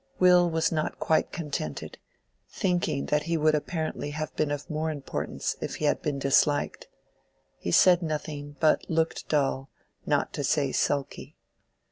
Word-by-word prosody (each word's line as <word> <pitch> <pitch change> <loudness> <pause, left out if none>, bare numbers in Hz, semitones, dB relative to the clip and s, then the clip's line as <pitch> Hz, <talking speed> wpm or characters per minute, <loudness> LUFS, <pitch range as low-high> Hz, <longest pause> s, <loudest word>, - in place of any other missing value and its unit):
Will 180 -1 +5
was 160 0 +1
not 155 -2 -1
quite 160 - +1
contented, 140 - -5 0.5
thinking 175 -6 -1
that 150 0 +1
he 170 - +2
would 155 0 +3
apparently 155 -1 -2
have 155 +1 -5
been 155 - 0
of 145 0 -4
more 155 0 -2
importance 145 -3 -3
if - - -4
he 155 - -3
had 145 - +2
been 150 -3 -2
disliked. 140 +2 +1 0.7
He - - -4
said 180 - +6
nothing, 150 -2 -4
but 155 - +2
looked 160 0 -1
dull, 135 -2 0 0.4
not - - +1
to - - -3
say - - +1
sulky. 140 -1 -2
155 Hz, 150 wpm, -27 LUFS, 145-160 Hz, 0.7 s, said